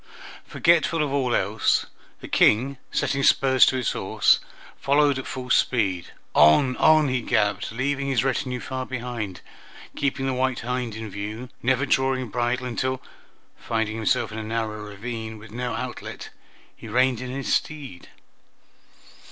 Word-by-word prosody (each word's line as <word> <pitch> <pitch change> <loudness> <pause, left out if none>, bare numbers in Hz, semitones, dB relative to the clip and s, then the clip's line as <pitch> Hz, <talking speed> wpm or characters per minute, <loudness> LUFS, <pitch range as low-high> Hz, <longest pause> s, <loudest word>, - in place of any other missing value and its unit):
Forgetful 165 -1 +2
of 140 -2 -2
all 130 -4 +1
else, 105 +3 +1 0.4
the - - -8
King, 130 +6 +3
setting 140 - 0
spurs 130 -1 +5
to - - +2
his 125 -3 0
horse, - - +2 0.4
followed 140 -1 +3
at 130 - -7
full 125 -1 -5
speed. 95 -11 +1 0.3
On, 125 - +5
on 155 -1 +5
he 130 -1 0
galloped, 105 -2 0
leaving 140 +4 -1
his 130 -4 +1
retinue 130 -1 -1
far 130 0 -4
behind, 120 -7 -5 0.5
keeping 135 -1 -1
the 135 - 0
white 130 -1 0
hind 125 -2 -3
in 110 0 -6
view, 105 +5 -6
never 130 +2 +2
drawing 130 -2 +1
bridle 120 +3 -1
until, 130 +1 -2 0.6
finding 110 -1 -2
himself 115 +1 0
in 110 - -5
a - - -5
narrow 110 -1 -3
ravine 110 +2 -6
with 105 0 -13
no 125 +2 -3
outlet, - - -6 0.4
he - - -11
reined 125 +2 +2
in 130 - -5
his 135 +1 -2
steed. 140 - -3
125 Hz, 150 wpm, -24 LUFS, 110-130 Hz, 0.6 s, spurs